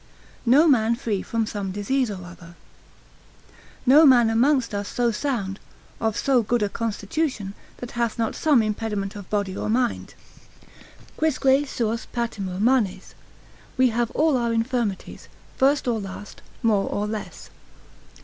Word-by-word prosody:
No 285 +7 +6
man 235 -5 +3
free 215 -5 -2
from 230 -1 -1
some 200 -3 -4
Disease 230 +6 0
or 185 -3 -6
other.] 175 -1 -13 1.3
No 280 +5 +7
man 245 -6 +6
amongst 245 +1 +2
us 205 0 -3
so 240 +1 0
sound, 210 -5 -3 0.4
of 220 -2 -1
so 265 -3 +3
good 230 +1 0
a 205 - 0
constitution, 220 0 -3 0.2
that 245 - -8
hath 235 -1 -2
not 225 -2 -1
some 285 -7 +3
impediment 210 -2 -3
of 200 -3 -9
body 200 -2 -1
or - - -3
mind. 240 +1 -1 1.0
Quisque 310 -4 -1 0.2
suos 230 -3 -2
patimur 200 -6 -3
manes, 210 -5 +1 0.6
we 255 0 +4
have 235 0 -1
all 310 -3 +3
our 235 -1 0
infirmities, 230 -3 -2 0.3
first 275 0 +2
or 235 -2 +1
last, 195 +1 -9 0.2
more 210 -4 +2
or 205 - -2
less. 210 0 -7
225 Hz, 140 wpm, -24 LUFS, 205-250 Hz, 1.3 s, No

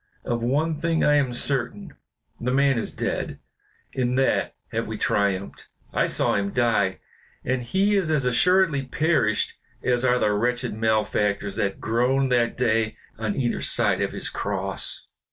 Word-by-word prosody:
Of 120 -1 -1
one 150 +6 0
thing 165 -1 +1
I 150 - +4
am 135 -3 +1
certain, 135 +8 -2 0.5
the 125 - -2
man 135 -1 +3
is - - -3
dead; - - -3 0.6
in 125 -1 0
that 135 0 +1 0.2
have - - -2
we - - -5
triumphed. 100 -1 -1 0.3
I - - +2
saw - - +1
him 100 0 0
die, 105 -4 +1 0.5
and 130 0 0
he 195 - +1
is 190 -5 +1
as 150 -4 +1
assuredly 165 +4 +3
perished 135 -4 0 0.3
as 125 0 +1
are 125 -1 +3
the 105 -4 +1
wretched 125 +3 -1
malefactors 105 -2 0
that 100 -3 -1
groaned 125 +4 +1
that 120 -2 +1
day 115 -3 +1 0.2
on 110 -2 -2
either 120 -3 -1
side - - +4
of - - -1
his - - -1
cross." - - -1
125 Hz, 155 wpm, -24 LUFS, 110-140 Hz, 0.6 s, I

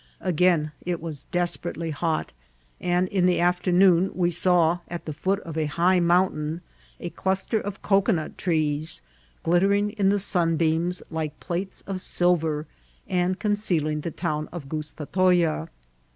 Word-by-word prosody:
Again 175 -3 +2
it 175 -1 -2
was 160 -4 -7
desperately 175 -1 -2
hot, 160 +1 -1 0.5
and 180 +1 +1
in 185 -2 +2
^e 180 - +3
after 180 +1 +1
noon 180 0 +5
we 175 -1 +1
saw 175 0 +3
at 175 0 -6
the 155 - -4
foot 190 +6 0
of 160 -2 -5
a 155 - 0
high 175 +5 +3
mountain 170 -2 +1 0.4
a 175 - -5
dust^ 190 +3 -2
of 200 -1 -6
cocoanut 195 -5 +1
trees, 155 - -1 0.4
glittering 200 +4 +2
in 205 -2 +1
the 205 - +3
sunbeams 170 -2 +1
like 155 -2 -4
platev 185 +2 -4
of 195 -1 -3
silv^, 165 -4 +1 0.4
and 180 0 0
concealing 175 -8 0
the 170 - -3
town 155 -2 -3
of 165 -5 -7
Gustatoya. 160 - 0
175 Hz, 140 wpm, -25 LUFS, 160-185 Hz, 0.5 s, noon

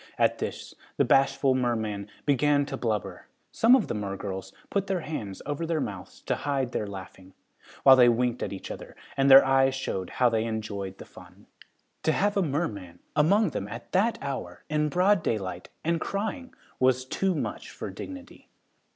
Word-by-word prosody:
At - - +2
this - - -5 0.2
the - - +4
bashful 135 0 +3
merman 110 -5 -1 0.2
began 145 +1 +3
to 135 - -5
blubber. 110 -6 -3 0.2
Some 235 +3 +6
of 255 - +1
the - - -2
mergirls 95 -2 -5 0.2
put 200 -1 0
their 190 -3 -1
hands 110 -12 -6
over 145 +3 -3
their 165 -1 0
mouths 100 -9 -6
to - - -1
hide 135 -3 -1
their 105 - -2
laughing, 95 -1 -10 0.5
while 135 -1 +9
they 125 -2 +7
winked 120 0 +1
at - - -2
each 95 - -7
other - - -9 0.2
and 135 0 +3
their 135 0 +10
eyes 135 0 +3
showed 95 -8 -3
how 125 - +2
they 115 -1 +1
enjoyed 100 -4 -4
the - - -10
fun. - - -16 0.6
To 160 - +2
have 205 +4 +1
a 200 - +3
merman 115 - -3 0.2
among 195 +7 +4
them, 100 - -4
at 115 +3 -9
that 215 +5 +2
hour, 130 -11 -5
in 150 0 +1
broad 185 +4 +3
daylight, 95 - -3
and 165 0 0
crying, 220 +7 -4 0.2
was 130 0 +3
too 190 +7 0
much - - -4
for - - -7
dignity. 275 -1 -10
135 Hz, 175 wpm, -27 LUFS, 105-160 Hz, 0.6 s, their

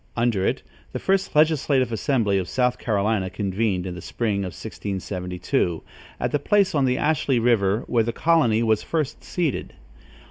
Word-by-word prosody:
Under 115 -5 +1
it, - - -1 0.3
the - - -2
first 190 -3 0
legislative 145 -5 +3
assembly 110 -3 +1
of 90 - -4
South 125 -1 +1
Carolinia 105 -3 0
convened, 100 -2 -1
in 90 - -4
the 90 - -8
spring 105 +2 -2
of 95 -3 -4
1672, 90 -5 -3 0.4
at - - -1
the 145 - +1
place 200 +6 +2
on 140 -3 +2
the 125 0 +1
Ashley 145 -4 +1
River 115 -2 +2
where 115 -2 +2
the 115 - -1
colony 120 -7 +2
was 110 -2 +2
first 155 -3 -3
seated. 165 -7 -2
115 Hz, 165 wpm, -23 LUFS, 100-140 Hz, 0.4 s, legislative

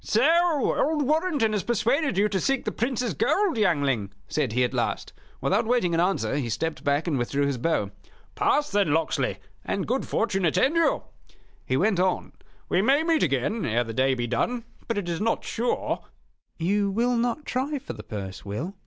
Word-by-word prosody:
"So 320 +5 +3
old 300 -1 +1
Warrenton 300 -6 +1
has 210 - +1
persuaded 240 - +1
you 205 +2 +4
to 195 -2 0
seek 270 +7 0
the 215 - -1
Prince's 240 -2 -1
gold, 380 - +1
youngling?" 140 - +1 0.2
said 135 -5 -1
he, 125 +1 +2
at 125 - -1
last. - - -2 0.3
Without 215 +4 +1
waiting 235 -8 +2
an 165 - +2
answer, 180 -5 +1
he 130 -5 -2
stepped 160 +8 -3
back 145 +2 +1
and 150 -7 0
withdrew 140 +4 0
his 140 -3 -1
bow. 120 -9 0 0.4
"Pass, 295 0 +1
then, 200 -7 +2
Locksley, 160 -1 0 0.3
and - - -2
good - - -1
fortune 195 -4 0
attend 260 - +2
you," 335 0 +2 0.6
he 130 - +1
went 195 +1 +2
on. 185 0 0 0.4
"We 180 - +2
may 275 +8 +3
meet 325 -2 +2
again 150 - 0
ere 120 +1 +1
the 115 -1 -6
day 130 +3 +2
be 120 -1 -2
done; 230 - -1 0.2
but 230 - -1
it 200 -4 -2
is 170 +2 -2
not 225 +1 0
sure 240 +2 -2 0.3
" - - -41 0.2
"You 200 +4 +1
will 240 +5 +1
not 240 +5 -1
try 275 +4 -1
for 275 - -7
the - - -9
purse, 95 -3 -7
Will?" 120 - -4
200 Hz, 195 wpm, -26 LUFS, -, 0.6 s, you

